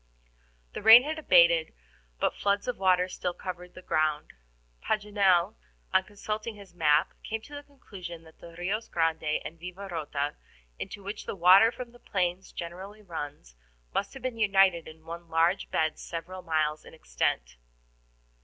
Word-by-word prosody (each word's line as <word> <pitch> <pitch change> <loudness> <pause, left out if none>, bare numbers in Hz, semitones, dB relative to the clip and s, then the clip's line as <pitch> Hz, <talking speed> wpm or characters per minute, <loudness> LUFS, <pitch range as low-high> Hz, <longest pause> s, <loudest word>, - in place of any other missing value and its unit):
The - - -5
rain 225 +4 +10
had 310 +2 -3
abated, 170 - +4 0.4
but - - +1
floods 200 +2 0
of 250 - -3
water 185 -1 +3
still 180 -1 -4
covered 180 -1 -7
the 185 - -11
ground. 155 -2 0 0.5
Paganel, 200 -4 +2 0.4
on 190 - +4
consulting 215 +2 -5
his 200 -3 -14
map, 150 -4 +3
came 225 - -3
to 290 - -14
the 290 - -6
conclusion 190 - -10
that 160 -1 -18
the 170 -1 -12
RIOS 200 +6 -2
Grande 160 -2 0
and 165 - -8
Vivarota, 170 -5 -4 0.4
into 200 - -7
which 200 +2 -6
the - - -3
water 190 +5 +7
from 245 0 -8
the 240 - -18
plains 185 -3 -2
generally 190 +5 -8
runs, 145 - -7 0.4
must 200 +6 -2
have 265 - -10
been 250 -3 -3
united 195 -5 +4
in 160 0 -13
one 170 0 -8
large 165 +4 +2
bed 155 -1 0
several 175 +3 -6
miles 155 -3 0
in - - -14
extent. - - -2
180 Hz, 155 wpm, -28 LUFS, 165-205 Hz, 0.5 s, rain